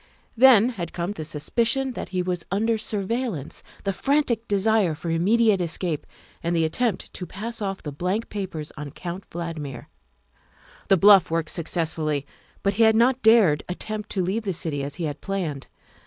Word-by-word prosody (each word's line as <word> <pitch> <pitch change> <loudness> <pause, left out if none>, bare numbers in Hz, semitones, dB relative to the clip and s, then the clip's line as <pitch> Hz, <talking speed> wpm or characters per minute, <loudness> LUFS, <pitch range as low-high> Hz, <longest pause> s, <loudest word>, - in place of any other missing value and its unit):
Then 240 -2 +7
had 180 -9 -5
come 175 +2 -2
the 160 -6 -6
suspicion 230 - 0
that - - -6
he 185 -1 -1
was 180 -1 -2
under 220 +3 +1
surveillance, 210 - -2 0.2
the 195 - -1
frantic 255 -2 0
desire 200 -4 +2
for 165 +2 -4
immediate 205 +4 +3
escape, 170 -2 -2 0.3
and 170 +1 -1
the 165 -1 +2
attempt 220 +5 -1
to 180 - -6
pass 225 +3 -6
off 195 -1 -3
the 150 - -4
blank 185 +9 -2
papers 185 -7 -5
on 150 -1 -6
Count 175 +6 -7
Valdmir. 160 -7 -6 1.0
The 195 - +5
bluff 195 -1 +7
worked 165 -1 -1
successfully, 160 -3 -1 0.4
but 200 - +2
he 215 - 0
had 220 -1 +6
not 245 +3 +3
dared 220 -10 +5
attempt 215 +3 -5
to 190 - 0
leave 195 +6 -1
the 200 -3 -2
city 160 -4 -3
as 140 0 -5
he 170 - -5
had 145 -2 -4
planned. 175 -9 -3
190 Hz, 170 wpm, -24 LUFS, 165-220 Hz, 1.0 s, Then